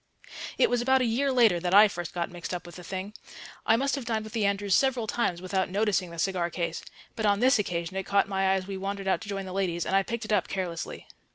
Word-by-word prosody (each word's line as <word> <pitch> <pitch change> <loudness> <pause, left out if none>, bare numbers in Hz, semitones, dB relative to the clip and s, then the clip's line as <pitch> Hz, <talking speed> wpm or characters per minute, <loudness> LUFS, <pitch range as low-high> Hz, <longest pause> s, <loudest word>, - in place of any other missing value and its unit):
It - - +5
was 245 -1 0
about 265 +1 +3
a - - +2
year 260 +5 +1
later 230 -9 +4
that 180 +2 0
I 210 +1 +9
first 175 -4 -6
got 175 +1 -3
mixed 175 +1 -5
up 175 - -7
with 175 - -11
the 180 - -10
thing. 190 +3 -5 0.5
I 225 - +6
must 270 +3 0
have 275 - -2
dined 220 -2 -1
with 215 - -10
the 215 -4 +1
Andrews 200 -1 0
several 260 -2 +2
times 185 -6 -1
without 190 0 -1
noticing 195 -2 0
the 170 - -10
cigar 175 0 0
case, 170 -1 -3 0.3
but 220 -2 0
on 200 0 +3
this 255 0 +4
occasion 175 -2 -3
it 195 - -1
caught 200 -1 +3
my 195 -1 0
eye 190 - +4
as 190 -1 -2
we 195 0 -5
wandered 195 0 -4
out 190 - +1
to 215 - -8
join 195 -1 -3
the 185 - -7
ladies, 180 -3 -1
and 190 - 0
I 195 - +5
picked 235 +3 -4
it 215 - -1
up 195 -4 +2
carelessly. 180 -4 -4
195 Hz, 270 wpm, -27 LUFS, 180-220 Hz, 0.5 s, I